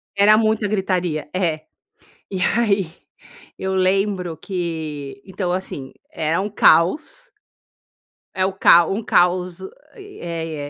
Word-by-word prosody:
era 205 +2 +5
muita 220 -1 +1
gritaria. 180 -6 -1
É. 160 -4 -1 0.7
E 190 -2 -4
aí, 200 -2 +2 0.7
eu 190 0 -2
lembro 185 -2 0
que 160 -3 -5
então 185 -2 -3
assim, 180 -7 -5 0.2
era 160 - -1
um 200 - -2
caos. 305 - +2 1.0
É 185 0 +1
o 190 - -2
cao 175 -2 +5
um 220 - -3
caos, 180 -2 +1
eh - - -7 0.3
eh 170 - -6
185 Hz, 120 wpm, -20 LUFS, 170-200 Hz, 1.0 s, era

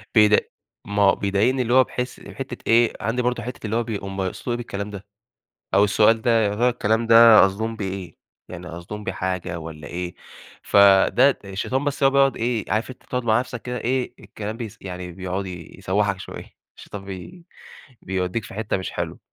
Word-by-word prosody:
بيد 105 -1 +5 0.4
ما 100 0 -1
هو 95 - +5
بيضايقني 105 +7 +1
اللي 120 0 0
هو 130 0 +7
بحيث 125 0 -5
حتّة 135 -2 -6
إيه، 115 0 +4
عندي 115 +4 0
برضه 125 -1 -1
حتّة 125 -2 -7
اللي 110 - -2
هو 120 - +1
بيق 110 -4 -5
هُم 95 0 -4
يقصدوا 95 +6 -3
إيه - - -1
بالكلام 100 -3 -5
ده؟ 100 0 -8 0.7
أو 100 - +6
السؤال 110 +2 +3
ده 120 - +2
يا 100 0 0
ترى 120 +3 +2
الكلام 115 -1 0
ده 115 -1 +8
قصدهم 110 +4 -2
بيه 100 - -4
إيه، 95 -4 -7 0.3
يعني 90 0 -8
قصدهم 90 +5 -8
بيه 95 - -2
حاجة 90 -2 -3
والّا 80 -2 -9
إيه؟ 90 0 -5 0.5
فده 100 +7 +5
الشيطان 115 +8 -2
بس 145 -1 -2
هو 135 - +6
بيقعد 135 0 +3
إيه 115 -2 -1
عارف 110 +4 0
أنت 130 - -12
تقعد 125 -1 -3
مع 110 0 +3
نفسَك 125 -2 -5
كده 125 0 -4
إيه 125 +1 -1
الكلام 110 +1 -7
بيس 115 -2 -7
يعني 90 -2 -7
بيقعد 95 +2 -4
يسوّحَك 95 +3 -2
شوية - - -9 0.3
الشيطان 100 -1 -9
بي 100 - -9 0.6
بيوديك 95 +3 -2
في - - -10
حتّة 110 -2 -1
مش 95 - -4
حلوة - - -4
105 Hz, 190 wpm, -23 LUFS, 95-120 Hz, 0.7 s, ده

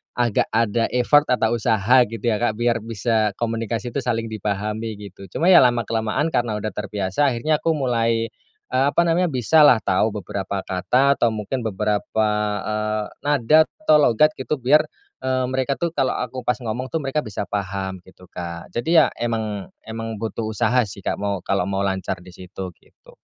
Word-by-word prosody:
agak 120 -3 +1
ada 115 0 +1
effort 145 +4 +4
atau 120 -2 +2
usaha, 110 +1 +2 0.2
gitu, 115 -3 -7
ya, 110 - +3
Kak, 115 -3 0
biar 120 -1 +1
bisa 110 -1 0
komunikasi 115 0 -2
itu - - +1
saling 115 -2 -1
dipahami, 105 +1 -3
gitu. 100 -1 -11
Cuma, 170 - 0
ya, 185 -2 +8
lama-kelamaan 120 +3 +1
karena 120 -3 0
udah 110 0 -3
terbiasa 100 +7 -1
akhirnya 150 +5 0
aku 165 -1 +1
mulai, 115 -4 0 0.4
eee, 130 +2 +2
apa 170 - +5
namanya, 170 +2 +2
bisalah 130 -3 +4
tau 100 +4 +2
beberapa 100 0 -4
kata 125 +10 +1
atau 120 - +4
mungkin 110 +5 -3
beberapa, 105 +1 0 0.3
eee, 105 0 -1 0.2
nada 145 +2 +4 0.2
atau 155 -5 +6
logat, 150 +3 +4
gitu, 140 +3 -1
biar, 150 +4 +3 0.3
eee, 130 0 0
mereka, 130 +1 0
tuh, 170 +2 -2
kalau 135 -5 0
aku 125 0 -5
pas 125 - +3
ngomong, 120 +3 -3
tuh, 160 +1 -3
mereka 135 +3 -1
bisa 110 -7 -4
paham, 95 -1 -4
gitu, 95 0 -18
Kak. 85 -1 -7
Jadi, 160 +9 0
ya, - - 0
emang 110 -4 -2 0.2
emang 115 0 -5
butuh 110 +1 -4
usaha, 110 +3 +1
sih, 100 -1 -10
Kak, - - -2
mau 100 -2 -2
kalau 100 0 0
mau 100 0 -1
lancar 95 -2 -2
di 90 - -13
situ, 90 +1 -8
gitu. - - -22
115 Hz, 175 wpm, -22 LUFS, 100-130 Hz, 0.4 s, ya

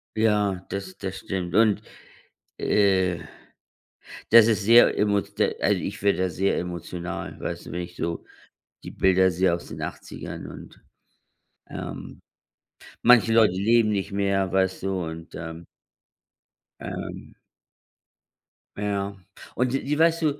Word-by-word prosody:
Ja, 105 -4 +1
das 95 -1 -6
das 95 -1 -5
stimmt 90 -3 -4
und, 105 -2 +4 0.8
äh, 95 -4 +2 1.1
das 115 -1 +9
ist 110 -2 +1
sehr 115 +3 +6
emo 100 -1 +2
d - - -1
also - - +2
ich - - -5
werde 100 -2 +2
da 95 - +1
sehr 95 +3 0
emotional, 85 0 -5
weißt - - -5
du, - - -8
wenn 90 - -3
ich 90 0 -9
so 85 0 -3 0.6
die - - -7
Bilder 95 0 +3
sehe 90 0 +2
aus 85 - -7
den - - -8
80ern - - -7
und, - - -12 0.9
ähm - - -7 0.8
manche 115 -2 +6
Leute 110 -5 +5
leben 110 +3 +3
nicht 100 -1 -2
mehr, 100 -2 0
weißt 95 -1 +1
du, 95 -2 -1
und 80 0 -8
ähm 80 +1 -7 1.1
Ähm - - -7 1.4
Ja. 100 -1 -2 0.4
Und 125 +1 0
die 135 - -1
die 145 +2 -1
weißt 165 +1 +3
du 145 -2 0
95 Hz, 135 wpm, -25 LUFS, 90-110 Hz, 1.4 s, das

